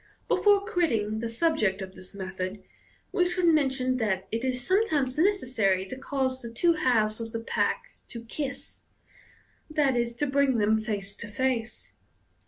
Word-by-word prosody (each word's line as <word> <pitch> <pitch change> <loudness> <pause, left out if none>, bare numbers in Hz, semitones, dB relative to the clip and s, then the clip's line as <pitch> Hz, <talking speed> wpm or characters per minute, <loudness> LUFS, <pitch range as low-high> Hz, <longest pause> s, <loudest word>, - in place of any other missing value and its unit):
Before 405 -1 +4
quitting 230 - 0
the 230 0 -3
subject 230 - +1
of 190 -1 -6
this 185 +1 -14
method, 190 0 -5 0.5
we 360 -2 +2
should 360 0 0
mention 265 -5 +2
that 195 -5 -1
it 225 +2 -2
is 250 -1 -1
sometimes 305 - +1
necessary 250 - +2
to 195 - -6
cause 260 -1 -2
the 235 - -6
two 335 +9 +3
halves 225 -8 +2
of 225 0 -5
the 230 - -2
pack 230 - -1 0.2
to 235 -2 -9
'kiss,' 275 +2 -5 0.9
5 280 -4 +3
e., 235 - +3
to 240 +5 -2
bring 275 -2 +2
them 215 +1 +3
face 205 -2 -4
to 230 - -7
face. 240 0 -2
250 Hz, 160 wpm, -27 LUFS, 215-285 Hz, 0.9 s, Before